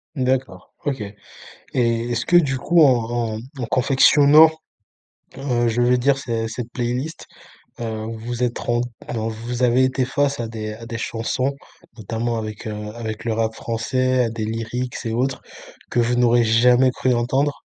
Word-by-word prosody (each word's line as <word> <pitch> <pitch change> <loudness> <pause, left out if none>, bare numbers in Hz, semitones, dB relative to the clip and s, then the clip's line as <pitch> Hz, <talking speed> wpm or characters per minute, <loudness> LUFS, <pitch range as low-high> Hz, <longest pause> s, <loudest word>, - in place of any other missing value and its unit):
D'accord, 130 -8 -2
OK 135 -5 -2 0.5
et 115 -1 -1
est-ce 120 0 -1
que, 175 - +2
du 135 -6 +2
coup, 170 +6 +3
en 120 -4 +2
en - - -5 0.2
en 120 - -2
confectionnant, 145 +5 +6 0.9
heu, 120 -4 0
je 115 +2 0
veux 125 +1 +4
dire, 135 +2 +3
cet 115 -4 -3
cette 115 +1 -6
playlist, 125 +6 -3 0.5
heu, 110 -2 -4
vous 120 +2 -4
êtes 120 -1 -2
rent 120 0 0 0.3
alors, 115 -1 -2
vous 120 +3 -5
avez 125 +2 +4
été 130 0 +1
face 140 +1 0
à 115 - -2
des 110 -1 -5
à 115 +2 -10
des 115 0 -5
chansons, 120 +4 -2 0.5
notamment, 115 +2 -2
avec, 110 -1 -6
heu, 105 -1 -5
avec 110 -2 -6
le 115 - -1
rap 110 0 -1
français, 130 +3 0
à 115 - -1
des 110 -1 -4
lyrics 115 +3 -4
et 115 - -2
autres 130 +3 -1 0.5
que 120 - +1
vous 120 +1 +1
n'auriez 120 -1 +4
jamais 125 +3 +4
cru 130 0 0
entendre? 135 +5 0
120 Hz, 170 wpm, -21 LUFS, 115-130 Hz, 0.9 s, confectionnant